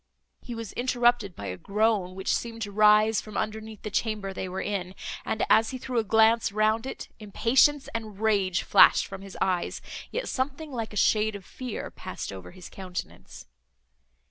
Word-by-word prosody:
He 240 - -7
was 225 -2 -6
interrupted 240 -5 +1
by 100 - -7
a 90 -1 -4
groan, 205 - 0
which 190 0 -1
seemed 230 -1 -4
to 205 - -5
rise 215 +1 +5
from 215 -2 -8
underneath 215 0 -4
the 215 - -5
chamber 210 -2 -1
they 185 0 -4
were 185 +1 -4
in; 190 -2 -3 0.3
and, 220 - 0
as 220 0 +4
he 260 - -4
threw 250 -1 -2
a - - +1
glance 220 +1 +4
round 215 +3 +1
it, - - -7
impatience 255 +7 +3
and 215 -3 -5
rage 200 -4 +1
flashed - - +6
from 195 0 -8
his 195 -1 -10
eyes, 180 -2 0 0.3
yet - - -3
something 285 +3 -3
like 230 -4 -4
a 210 - -6
shade 215 +1 +3
of 195 -2 -9
fear 250 -4 -6
passed - - -7
over 95 -2 -9
his 180 - -11
countenance. 185 -2 -8
215 Hz, 180 wpm, -27 LUFS, 195-230 Hz, 0.3 s, flashed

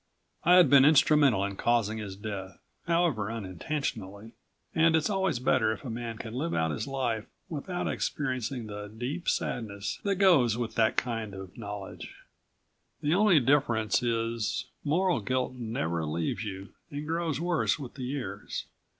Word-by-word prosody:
I 175 +2 +6
had 180 -4 +8
been 135 0 +7
instrumental 145 -7 +5
in 100 -1 -4
causing 110 -2 +1
his 100 -3 -6
death, 95 -3 -6 0.3
however 165 - +1
unintentionally, 110 - -4 0.4
and 160 0 +4
it's 160 +5 +2
always 190 -7 +1
better 125 -3 +2
if - - -10
a 120 - -4
man 115 -1 -5
can 110 -1 -7
live 155 +7 -2
out 80 0 +1
his 75 - -3
life 120 -5 -2 0.2
without 175 +3 -3
experiencing 130 -3 -2
the 105 -1 -6
deep 125 +11 -3
sadness 100 -4 -2
that 200 -1 0
goes 155 - +4
with 120 -2 -3
that 110 0 +2
kind 115 -5 -2
of 95 -1 -9
knowledge. 100 -3 -7 0.9
The 150 +2 +2
only 195 -3 +5
difference 120 -6 +2
is 115 -2 -1 0.2
moral 175 +3 +2
guilt 130 +4 -1
never 110 -9 -2
leaves 80 +6 -2
you 95 -2 -6 0.2
and 145 +1 -5
grows 165 -2 -1
worse 175 -1 +1
with 140 -5 -8
the 130 -2 -6
years. 125 -7 -4
120 Hz, 155 wpm, -29 LUFS, 105-150 Hz, 0.9 s, had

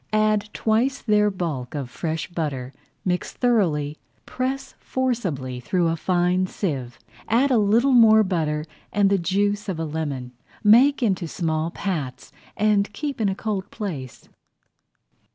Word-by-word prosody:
Add 215 -1 +2
twice 235 +5 +1
their 210 -2 +3
bulk 155 -9 -4
of 140 -3 -3
fresh 160 +5 -3
butter, 140 -7 -4 0.3
mix 180 -1 -1
thoroughly, 160 - +1 0.3
press 265 +1 -3
forcibly 185 - -2
through 170 +7 +1
a 165 - 0
fine 180 +2 +1
sieve, 135 - -3 0.3
add 255 +5 +3
a 240 - +4
little 225 +6 +3
more 220 -3 +7
butter 155 -5 -1 0.3
and 200 -1 +3
the 200 - +3
juice 205 +3 0
of 175 -4 -3
a 165 - -1
lemon. 145 -5 -4 0.3
Make 250 +6 +6
into 190 -6 +1
small 160 -1 -1
pats 160 -8 -4 0.3
and 210 -1 +2
keep 280 +2 -4
in 205 - +2
a 190 - -2
cold 205 -2 -3
place. 150 - -6
190 Hz, 140 wpm, -23 LUFS, 155-215 Hz, 0.3 s, more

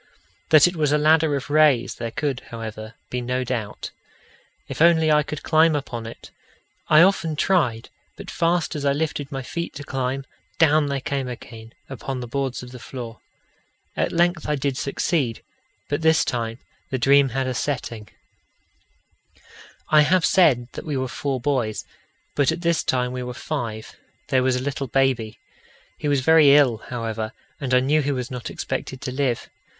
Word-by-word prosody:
That 155 0 +7
it 175 - -3
was 150 -3 +1
a 150 - +4
ladder 155 0 +3
of 140 +1 -5
rays 150 -5 +4
there 115 -1 -5
could, 135 +2 -2
however, 110 -1 -7 0.2
be 125 - -2
no 125 +1 -1
doubt: 115 -4 -4 0.8
if - - -6
only 160 -2 +5
I 150 0 +5
could 150 0 -6
climb 160 0 +4
upon 120 -5 -4
it! 115 - -11 0.6
I 155 +2 +7
often 175 -4 +2
tried, 145 -10 +1 0.3
but - - -8
fast 170 -1 0
as 145 - -4
I 140 -1 +2
lifted 145 -1 -3
my 135 -1 -4
feet 170 +6 -5
to 145 - -7
climb, 135 0 -3 0.3
down 155 -2 +4
they 140 -1 -2
came 135 -1 -2
again 115 -2 -9
upon 135 0 -5
the 125 - -6
boards 135 0 -3
of 125 - -10
the 125 - -10
floor. 120 -3 -8 0.8
At - - 0
length 170 -2 +1
I 150 - +2
did 140 -1 -1
succeed, 140 -3 -1 0.4
but 145 +2 -2
this 160 0 +4
time 115 -2 -2 0.3
the 130 - -1
dream 135 +2 +4
had 135 +2 -1
a 130 - -2
setting. 120 -5 -3 1.8
I 155 -1 +6
have 175 +3 +3
said 135 -10 +4
that - - -7
we 150 -3 -3
were 130 0 -1
four 135 +1 -3
boys; 125 -5 -1 0.5
but 145 +1 +3
at 165 +1 -4
this 170 -2 +1
time 125 -1 0
we 125 0 -4
were 125 0 -6
five 115 -7 -5 0.3
there 130 - +3
was 130 0 +2
a 125 - -2
little 140 0 -3
baby. 125 -3 0 0.6
He 150 - -3
was 140 -2 +2
very 150 -1 +6
ill, 135 -6 +4
however, 115 -2 -4 0.3
and 135 -3 -4
I 125 0 +5
knew 150 +4 +2
he 145 0 -1
was 125 -2 -3
not 125 -2 -5
expected 130 - -4
to 130 - -4
live. 130 -3 -1
135 Hz, 180 wpm, -23 LUFS, 125-150 Hz, 1.8 s, That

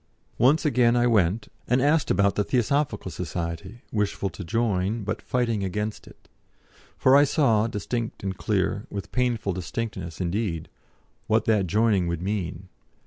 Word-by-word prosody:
Once 145 +7 +4
again 120 -4 +4
I 120 0 +3
went, 105 -2 +2 0.2
and 125 +2 +3
asked 145 +3 +2
about 100 +1 +3
the 105 - +1
Theosophical 125 -4 0
Society, 90 +5 -5
wishful 100 -2 -1
to 95 - -8
join, 105 +1 0
but 110 +3 -3
fighting 115 -5 0
against 105 +3 -3
it. - - -17 0.7
For 130 - +5
I 145 - +7
saw, 115 -7 +3
distinct 115 +1 -4
and 95 -1 -2
clear - - -1
with 100 -1 -6
painful 120 -6 0
distinctness, 95 -1 -5
indeed 90 -2 -2 0.6
what 110 0 +2
that 105 -4 +2
joining 105 -1 +2
would 85 0 -3
mean. 95 -2 -3
105 Hz, 145 wpm, -25 LUFS, 95-120 Hz, 0.7 s, I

